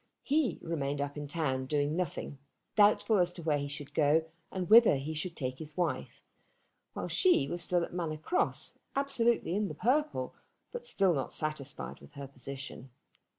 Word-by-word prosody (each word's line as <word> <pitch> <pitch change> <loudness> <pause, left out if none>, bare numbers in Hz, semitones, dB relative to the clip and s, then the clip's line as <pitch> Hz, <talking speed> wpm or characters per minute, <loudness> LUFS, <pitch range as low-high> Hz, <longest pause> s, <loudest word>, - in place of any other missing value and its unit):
He 290 -2 +1
remained 145 -4 -2
up 145 0 -2
in 145 -1 -5
town 135 -4 -1
doing 145 +1 +1
nothing, 165 -5 -3 0.4
doubtful 210 0 +5
as 175 0 +3
to 170 - -7
where 150 -2 +2
he 140 - -3
should 145 0 -7
go 155 +1 +3 0.3
and 185 -2 -3
whither 225 -4 +8
he 140 +4 -3
should 165 +3 -3
take 130 -2 -3
his 155 0 -8
wife, 175 -2 -2 0.7
while - - -4
she 360 - +3
was 175 +4 -3
still 175 0 +1
at - - -6
Manor 165 -3 -2
Cross, 250 - -1 0.2
absolutely 240 -9 +1
in 210 0 +1
the - - -6
purple, 295 +6 +1 0.4
but 485 0 -6
still 195 - +3
not 135 -4 -2
satisfied 150 -2 -4
with - - -16
her 140 -1 -7
position. 135 0 -8
160 Hz, 175 wpm, -31 LUFS, 145-195 Hz, 0.7 s, whither